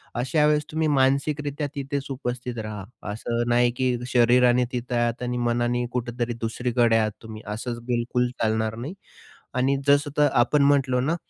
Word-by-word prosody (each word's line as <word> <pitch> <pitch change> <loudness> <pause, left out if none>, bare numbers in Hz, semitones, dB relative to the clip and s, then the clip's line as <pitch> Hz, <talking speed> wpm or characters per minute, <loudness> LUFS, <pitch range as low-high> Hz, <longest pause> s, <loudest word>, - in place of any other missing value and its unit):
अशा 130 +5 +1
वेळेस 150 -1 +2
तुम्ही 155 0 0
मानसिकरित्या 145 +1 +1
तिथेच 140 0 -3
उपस्थित 125 -2 -4
राहा. 110 -3 -5 0.3
असं 115 +2 -2
नाही 120 0 +3
की 130 -1 +1 0.2
शरीराने 125 0 +4
तिथं 125 -1 -3
आहात 120 0 0
आणि 125 0 -2
मनाने 120 +1 0
कुठेतरी 120 -1 -2
दुसरीकडे 120 0 +1
आहात 110 -1 +1
तुम्ही. 110 -1 -9
असंच 115 +3 -4
बिलकुल 125 0 0
चालणार 110 0 0
नाही 130 +9 -6 0.6
आणि 135 +2 +2
जसं 145 +1 +4
तर 150 0 +5
आपण 125 +5 +3
म्हटलो 135 -3 +3
ना, 150 +6 +1
125 Hz, 155 wpm, -24 LUFS, 120-140 Hz, 0.6 s, तर